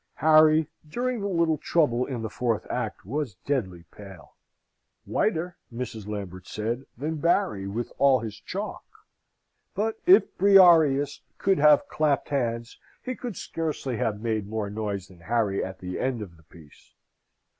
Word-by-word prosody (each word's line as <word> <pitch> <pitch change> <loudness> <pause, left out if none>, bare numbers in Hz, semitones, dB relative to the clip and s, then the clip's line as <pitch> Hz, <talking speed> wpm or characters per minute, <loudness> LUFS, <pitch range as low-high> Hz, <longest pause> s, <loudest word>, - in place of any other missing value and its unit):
Harry, 155 0 +5 0.2
during 245 +7 -2
the 200 - -2
little 170 -4 +1
trouble 125 -7 +1
in 125 -4 -4
the - - -2
fourth 115 -3 -1
act, - - -4
was 130 -1 -3
deadly 95 -12 -2
pale 95 -9 -13 0.7
whiter, 175 -3 -1
Mrs. 115 -3 -6
Lambert 95 -3 -6
said, 115 +5 -3
than 155 +5 -3
Barry, 145 - +1
with 115 +5 -4
all 135 -2 +5
his 110 -2 -5
chalk. 200 - -6 0.9
But 220 +2 -1
if 380 +2 +6
Briareus 165 -8 +5 0.2
could 195 -3 +2
have 150 0 +5
clapped 150 -3 0
hands, 115 -4 -2 0.2
he 255 - -3
could 240 -5 -6
scarcely 150 -6 -3
have 105 -1 -1
made 110 -3 -2
more 105 -1 -3
noise 100 -3 -4
than 90 -2 -17
Harry 100 +2 0
at 95 0 -6
the 90 0 -6
end 125 -4 -1
of 90 -4 -12
the 80 - -21
piece. 80 -3 -19
125 Hz, 150 wpm, -26 LUFS, 105-160 Hz, 0.9 s, if